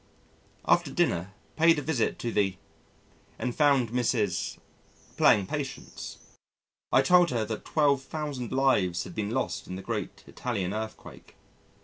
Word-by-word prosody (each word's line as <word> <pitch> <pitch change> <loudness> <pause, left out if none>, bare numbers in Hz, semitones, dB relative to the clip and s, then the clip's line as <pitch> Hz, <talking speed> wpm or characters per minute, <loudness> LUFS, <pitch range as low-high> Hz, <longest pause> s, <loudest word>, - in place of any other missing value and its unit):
After - - +3
dinner, 90 +3 0 0.2
paid 165 0 +5
a 145 - -2
visit 135 -6 0
to 120 - -3
the 95 -3 +1 0.8
and 125 -2 -3
found 140 -6 +3
Mrs. 115 -7 0 0.6
playing 100 - +5
Patience. 140 +5 -6 0.7
I - - +5
told 180 -1 +5
her 115 -3 0
that 110 0 -5
12,000 140 -3 0
lives 130 -10 +2
had 90 - -9
been 105 +1 -2
lost 130 +3 -2
in 90 - -5
the 95 - -7
great - - -4
Italian 100 -7 -3
earthquake. 110 0 -7
120 Hz, 130 wpm, -28 LUFS, 105-140 Hz, 0.8 s, paid